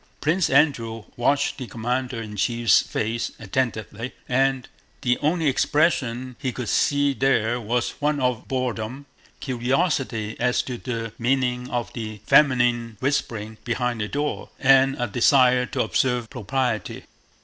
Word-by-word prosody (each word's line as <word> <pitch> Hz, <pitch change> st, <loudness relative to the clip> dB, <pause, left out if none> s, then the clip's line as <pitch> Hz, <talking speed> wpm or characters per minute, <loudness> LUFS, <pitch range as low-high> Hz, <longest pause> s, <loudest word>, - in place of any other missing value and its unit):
Prince 165 Hz, +3 st, +1 dB
Andrew 120 Hz, -6 st, +2 dB
watched 140 Hz, +5 st, +1 dB
the 130 Hz, -, -5 dB
commander 125 Hz, +2 st, -2 dB
in 110 Hz, -2 st, -7 dB
chief's 115 Hz, +1 st, +3 dB
face 115 Hz, +2 st, -3 dB
attentively, 115 Hz, +1 st, -3 dB
and 135 Hz, 0 st, +1 dB, 0.3 s
the 125 Hz, -1 st, +1 dB
only 160 Hz, +2 st, 0 dB
expression 130 Hz, -4 st, +1 dB
he 130 Hz, -, -2 dB
could 120 Hz, -2 st, -5 dB
see 145 Hz, -1 st, +2 dB
there 125 Hz, -3 st, +1 dB
was 120 Hz, +2 st, -1 dB
one 150 Hz, 0 st, +1 dB
of 125 Hz, -3 st, -1 dB
boredom, 130 Hz, 0 st, -3 dB, 0.3 s
curiosity 130 Hz, -4 st, -1 dB
as 125 Hz, 0 st, +1 dB
to 125 Hz, -2 st, -6 dB
the 115 Hz, -3 st, -4 dB
meaning 125 Hz, 0 st, 0 dB
of 120 Hz, -1 st, -3 dB
the 110 Hz, -2 st, -6 dB
feminine 120 Hz, -5 st, +3 dB
whispering 110 Hz, -5 st, -2 dB
behind 120 Hz, -1 st, -1 dB
the 105 Hz, -, -1 dB
door, 145 Hz, +5 st, -3 dB
and 135 Hz, 0 st, +4 dB
a 120 Hz, -, +1 dB
desire 125 Hz, +2 st, +4 dB
to -, -, -1 dB
observe 125 Hz, -3 st, 0 dB
propriety. 125 Hz, -1 st, -2 dB
125 Hz, 135 wpm, -24 LUFS, 115-135 Hz, 0.3 s, and